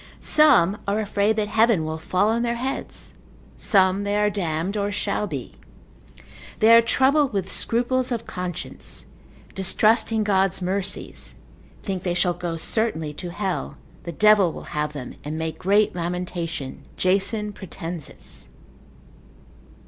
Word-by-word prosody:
Some 240 - +5
are 200 +2 +1
afraid 210 0 +1
that 210 -1 0
heaven 220 -7 +3
will 160 0 -4
fall 185 +5 +1
on 230 +1 +1
their 235 0 0
heads: 260 +3 -4 0.4
some 190 0 +3
they 205 0 0
are 210 0 +2
damned, 175 0 -2
or 205 -1 -1
shall 205 +1 -1
be. 140 -8 -5 1.1
They 225 +1 +6
are 230 - +8
troubled 270 +3 +3
with 195 -2 -2
scruples 250 +2 +1
of 230 -1 -2
consciences, 180 -2 -6 0.5
distrusting 220 +3 +2
God's 195 -3 +2
mercies, 190 +2 -4 0.5
think 190 -3 -3
they 175 -1 -1
shall 180 -1 +2
go 175 -1 -4
certainly 160 -5 -1
to 175 +4 -6
hell, 190 +1 -3 0.2
the 170 - -6
devil 205 0 +5
will - - -9
have 150 0 -1
them, 130 -4 -7
and 150 +2 -4
make 160 0 -4
great 205 +3 +3
lamentation, 170 -5 -4
Jason 200 +3 0
Pratensis. 170 -4 -7
195 Hz, 135 wpm, -23 LUFS, 175-215 Hz, 1.1 s, are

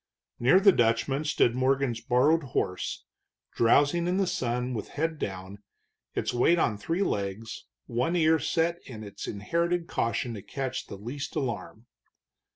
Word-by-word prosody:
Near 130 +10 +5
the 195 0 +7
Dutchman 135 +2 +1
stood 120 -5 +3
Morgan's 130 -2 +1
borrowed 145 +7 +3 0.2
horse, 90 - -2 0.5
drowsing 145 +8 +3
in 180 +1 +1
the 195 - +2
sun 125 -5 -1
with 110 - -4
head 160 0 -1
down, 95 +1 -5 0.6
its - - -1
weight 140 +8 +4
on 115 -9 +2
three 165 - -1
legs, 100 - -3 0.2
one 125 +9 -1
ear 160 -1 +4
set 170 +1 0
in 110 -4 -8
its 100 -2 -8
inherited 170 +12 -1
caution 115 -3 -1
to 105 - -7
catch 130 +3 -4
the 100 - -8
least 130 +8 -6
alarm. 115 - -4
130 Hz, 150 wpm, -28 LUFS, 115-160 Hz, 0.6 s, the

